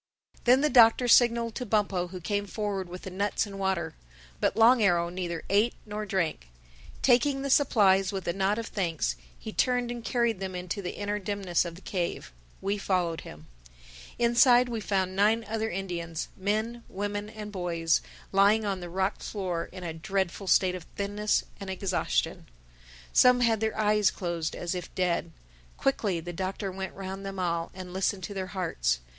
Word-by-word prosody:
Then 250 +2 +6
the 300 - +3
Doctor 240 0 +6
signaled 235 -1 +5
to 250 - -4
Bumpo 200 -5 0
who 185 +1 -8
came 205 +3 -2
forward 200 -3 -3
with 180 +1 -8
the 190 - -6
nuts 200 +4 0
and 200 -1 -8
water. 190 -2 -1 0.5
But - - +1
Long 235 +2 +6
Arrow 175 -4 +3
neither 175 -2 -4
ate 210 +4 +2
nor 210 0 -5
drank. 170 - -1 0.5
Taking 270 +2 +3
the 275 - -1
supplies 195 -9 +4
with 195 -2 -5
a 170 - +1
nod 195 +2 +1
of 230 - -3
thanks, 170 - -1 0.2
he - - -8
turned 245 -1 +1
and 240 -1 -6
carried 235 -5 0
them 190 -1 -4
into 180 +3 -4
the 180 - -5
inner 205 0 -2
dimness 195 -3 0
of 170 -1 -6
the 180 - -13
cave. 180 -3 -3 0.3
We 200 +1 -1
followed 180 -4 0
him. 75 +1 -11 0.7
Inside 240 +1 +5
we 230 -2 -2
found 190 -2 -1
nine 215 +3 +3
other 220 0 -1
Indians, 170 -4 -4
men, 220 +4 -2
women 205 +1 -3
and 215 -1 -8
boys, 170 -4 0 0.3
lying 205 +3 +4
on 195 -2 -1
the 175 -1 -7
rock 190 +2 -1
floor 180 -5 -3
in 185 -1 -9
a 165 -2 -4
dreadful 190 +3 -2
state 185 -1 +4
of 180 -3 -7
thinness 205 +1 0 0.2
and 195 - -7
exhaustion. 185 - -1 0.7
Some 250 0 +6
had 230 -3 +3
their 220 0 -1
eyes 210 -1 +4
closed, 170 -3 -3
as 175 0 -3
if 180 -2 -6
dead. 170 -2 0 0.5
Quickly 205 -10 0
the 175 +2 -7
Doctor 190 +2 -3
went 190 +1 -6
round 195 0 -6
them 195 0 -6
all 170 -2 -1
and 185 -1 -8
listened 190 0 -1
to 185 - -5
their 190 -1 -3
hearts. 165 - -1
195 Hz, 180 wpm, -28 LUFS, 180-215 Hz, 0.7 s, Then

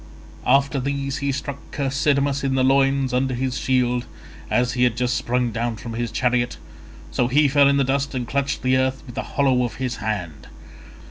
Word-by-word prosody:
After 140 +2 +3
these 140 +1 -2
he 140 0 -1
struck 140 +1 -4
Chersidamas 140 0 0
in 135 -1 0
the 130 - +2
loins 135 0 +2
under 130 0 +1
his 130 0 -2
shield 125 -1 +1 0.4
as 125 0 +1
he 125 0 +1
had 120 -2 +2
just 125 0 0
sprung 125 0 0
down 115 +1 -2
from 115 +2 -7
his 120 +1 -2
chariot; 120 +1 0 0.5
so 120 - +1
he 145 +4 +4
fell 140 0 +5
in 140 0 +3
the 140 - +3
dust 140 +1 -1
and 125 -2 -3
clutched 140 0 -1
the 130 0 +3
earth 130 0 0
in 125 - -9
the 130 - -3 0.2
hollow 130 -3 +3
of 120 - -3
his 130 -1 -3
hand. 95 -8 -4
130 Hz, 195 wpm, -22 LUFS, 125-140 Hz, 0.5 s, fell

